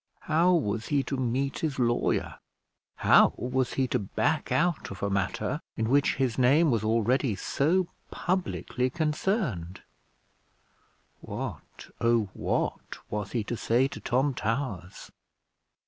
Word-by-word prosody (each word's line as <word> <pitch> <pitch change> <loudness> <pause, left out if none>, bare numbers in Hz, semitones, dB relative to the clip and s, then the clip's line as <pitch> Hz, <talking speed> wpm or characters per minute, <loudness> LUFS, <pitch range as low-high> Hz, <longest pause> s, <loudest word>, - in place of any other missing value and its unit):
How 165 +4 +3
was 115 -7 -1
he 140 -2 +1
to 140 - -3
meet 130 +2 -1
his 155 -4 -2
lawyer? 120 -2 0 0.6
How - - +5
was 130 +1 -1
he 135 - +1
to - - +1
back 145 +9 -1
out 170 -1 +1
of 100 - -8
a 100 - 0
matter 100 -1 -1 0.2
in 110 0 0
which 140 +1 +3
his 130 -2 0
name 140 +5 +5
was 115 -3 +1
already 115 +2 +1
so 170 - +1 0.2
publicly 175 -8 -1
concerned? 150 - -1 1.4
What, - - -7
oh 115 -3 +2
what! - - -2
was 105 -1 -3
he 115 -3 0
to 120 - -3
say 120 +3 +2
to - - -8
Tom 135 +3 +1
Towers? 110 - -4
130 Hz, 130 wpm, -28 LUFS, 110-145 Hz, 1.4 s, How